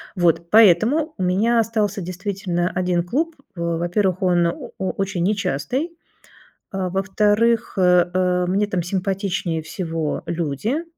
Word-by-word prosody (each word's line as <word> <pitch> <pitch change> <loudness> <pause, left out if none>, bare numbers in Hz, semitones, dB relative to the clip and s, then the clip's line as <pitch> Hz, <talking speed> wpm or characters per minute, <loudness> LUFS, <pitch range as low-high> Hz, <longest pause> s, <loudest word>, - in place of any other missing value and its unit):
Вот. 170 -2 +1
Поэтому 225 - +5
у 185 - -2
меня 215 +6 +2
остался 210 -3 0
действительно 185 -1 -2
1 180 -1 0
клуб. 315 - -1 0.2
В 170 -1 -2
во-первых 180 +2 0
он 175 -2 +3
о 170 - -5
очень 190 -1 -2
нечастый, 215 - -1 0.7
а, 190 -2 -2
во-вторых, 210 +5 +1
э, 180 -1 +4
э, 180 -1 +1
мне 200 +3 +1
там 185 -3 -1
симпатичнее 185 -2 -2
всего 165 -2 -3
люди, 175 - -2
185 Hz, 125 wpm, -21 LUFS, 175-210 Hz, 0.7 s, Поэтому